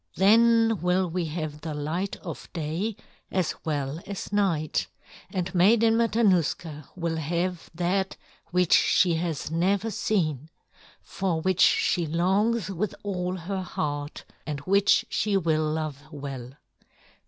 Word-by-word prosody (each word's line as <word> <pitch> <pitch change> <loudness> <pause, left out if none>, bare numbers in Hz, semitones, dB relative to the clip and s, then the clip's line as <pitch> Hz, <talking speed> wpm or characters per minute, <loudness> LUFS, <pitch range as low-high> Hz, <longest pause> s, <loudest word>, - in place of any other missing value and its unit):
Then 225 +2 +4
will 180 +1 +2
we 175 +1 -2
have 155 -1 -5
the 155 -2 -4
light 165 +7 -2
of - - -7
day 170 +7 -2 0.3
as 185 -4 0
well 145 -1 -2
as 200 0 -6
night, 175 -7 +1 0.4
and 185 -2 -3
Maiden 225 +5 +5
Matanuska 180 -9 +1
will 170 -2 -2
have 170 +3 -2
that 185 +3 0 0.3
which 180 -1 +2
she 180 -2 +4
has 160 -3 -2
never 195 +6 +1
seen, 155 - -1 0.5
for 185 -4 -2
which 185 +1 +1
she 170 -2 +3
longs 190 +5 +1
with 195 +2 -2
all 185 -2 -2
her 190 +2 -4
heart, 145 -4 -4 0.2
and 150 -2 -3
which 200 +5 +3
she 205 -2 +1
will 155 -3 +1
love 155 -3 -3
well. 135 -4 -7
175 Hz, 130 wpm, -26 LUFS, 155-195 Hz, 0.5 s, Maiden